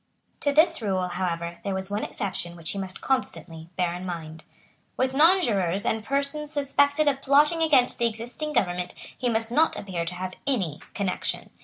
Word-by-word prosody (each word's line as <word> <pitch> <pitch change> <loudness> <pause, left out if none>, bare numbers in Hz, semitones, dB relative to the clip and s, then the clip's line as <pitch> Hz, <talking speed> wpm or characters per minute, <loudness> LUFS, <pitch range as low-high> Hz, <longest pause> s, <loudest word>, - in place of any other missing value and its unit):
To 285 - +1
this 320 0 +4
rule, 190 -4 0
however, 170 -1 -3
there 195 -1 -2
was 190 +1 -4
one 205 +1 -1
exception 175 -3 -4
which 165 -2 -5
he 200 - -4
must 190 -1 -4
constantly 165 - -2
bear 175 -2 +1
in 180 +1 -6
mind. 160 -3 -6 0.5
With 260 0 +1
nonjurors 235 - +3
and 220 -1 0
persons 280 +3 -1
suspected 285 +1 +3
of 275 -1 +2
plotting 295 +4 +4
against 280 -6 +4
the 235 - +3
existing 235 +7 -5
government 180 -8 0 0.2
he 250 - -1
must 225 0 0
not 315 +6 +3
appear 180 -4 -3
to 180 +1 -3
have 185 +1 -4
any 190 - 0 0.2
connection. 195 -3 -2
205 Hz, 175 wpm, -26 LUFS, 180-280 Hz, 0.5 s, this